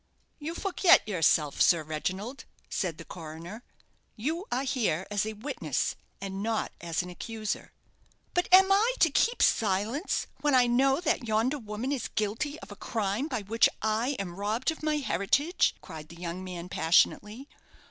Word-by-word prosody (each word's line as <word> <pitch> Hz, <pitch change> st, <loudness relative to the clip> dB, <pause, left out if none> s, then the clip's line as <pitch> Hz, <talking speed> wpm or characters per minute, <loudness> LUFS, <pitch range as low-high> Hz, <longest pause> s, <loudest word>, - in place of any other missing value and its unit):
"You 315 Hz, +3 st, -5 dB
forget 375 Hz, -, +4 dB
yourself, 160 Hz, -6 st, +2 dB
Sir 170 Hz, -3 st, +5 dB
Reginald," 185 Hz, -, -4 dB, 0.3 s
said 175 Hz, -5 st, -2 dB
the 165 Hz, -, -10 dB
coroner; 170 Hz, +6 st, -9 dB, 0.5 s
"you 320 Hz, -, -3 dB
are 255 Hz, +2 st, 0 dB
here 220 Hz, -, 0 dB
as 205 Hz, 0 st, 0 dB
a 220 Hz, -, -3 dB
witness, 230 Hz, +8 st, -2 dB, 0.2 s
and 195 Hz, 0 st, -5 dB
not 225 Hz, +1 st, -1 dB
as 170 Hz, 0 st, -1 dB
an 180 Hz, -, -8 dB
accuser." 215 Hz, +4 st, -5 dB, 0.6 s
"But 355 Hz, -, +1 dB
am 380 Hz, +1 st, +8 dB
I 445 Hz, +6 st, +4 dB
to 330 Hz, -, +4 dB
keep 470 Hz, -, +2 dB
silence, 220 Hz, -, +1 dB
when 295 Hz, -2 st, +2 dB
I 250 Hz, -1 st, +6 dB
know 270 Hz, +5 st, +3 dB
that 305 Hz, -7 st, 0 dB
yonder 225 Hz, +7 st, +1 dB
woman 220 Hz, +3 st, -4 dB
is 275 Hz, -5 st, -2 dB
guilty 230 Hz, +9 st, -2 dB
of -, -, -11 dB
a -, -, -8 dB
crime 215 Hz, +5 st, -2 dB
by 250 Hz, -9 st, -3 dB
which 225 Hz, +4 st, +3 dB
I 225 Hz, +6 st, +1 dB
am 180 Hz, -3 st, -5 dB
robbed 220 Hz, +8 st, 0 dB
of 320 Hz, -, -9 dB
my 305 Hz, 0 st, +1 dB
heritage?" 275 Hz, -, +1 dB
cried 155 Hz, -3 st, -10 dB
the 170 Hz, -, -11 dB
young 175 Hz, +1 st, -5 dB
man, 180 Hz, -2 st, -6 dB
passionately. 210 Hz, -, +2 dB
220 Hz, 165 wpm, -29 LUFS, 185-280 Hz, 0.6 s, am